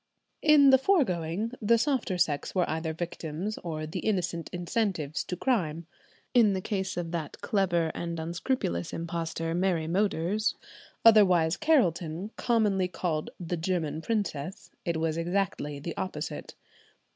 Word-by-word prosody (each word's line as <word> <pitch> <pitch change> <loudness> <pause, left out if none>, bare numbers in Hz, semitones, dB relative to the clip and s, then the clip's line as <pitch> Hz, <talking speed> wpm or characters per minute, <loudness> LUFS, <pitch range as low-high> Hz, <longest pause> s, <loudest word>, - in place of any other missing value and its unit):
In 290 -3 +7
the 265 - +7
foregoing 215 - +1
the 230 +2 +4
softer 250 -7 0
sex 150 -3 0
were 180 -2 +2
either 160 +1 -2
victims 170 +4 -4
or 155 -3 -4
the 155 - -4
innocent 175 -5 -1
incentives 175 -4 -1
to 180 - -3
crime. 170 - 0 0.5
In 225 -5 +5
the 190 - -1
case 190 -1 -3
of 170 -2 -3
that 165 -4 -4
clever 175 -5 +1
and 170 -1 -4
unscrupulous 165 - -2
impostor 165 -1 -3
Mary 175 -2 +1
Moders, 195 +3 +1 0.5
otherwise 185 -7 +6
Carelton, 190 - +1
commonly 210 -6 +2
called 165 -3 -2
the 175 0 -3
German 160 -2 -1
Princess, 195 -6 -3
it 170 -2 0
was 160 0 -1
exactly 170 -4 -1
the 165 +3 -5
opposite. 155 -4 -5
175 Hz, 135 wpm, -28 LUFS, 160-205 Hz, 0.5 s, In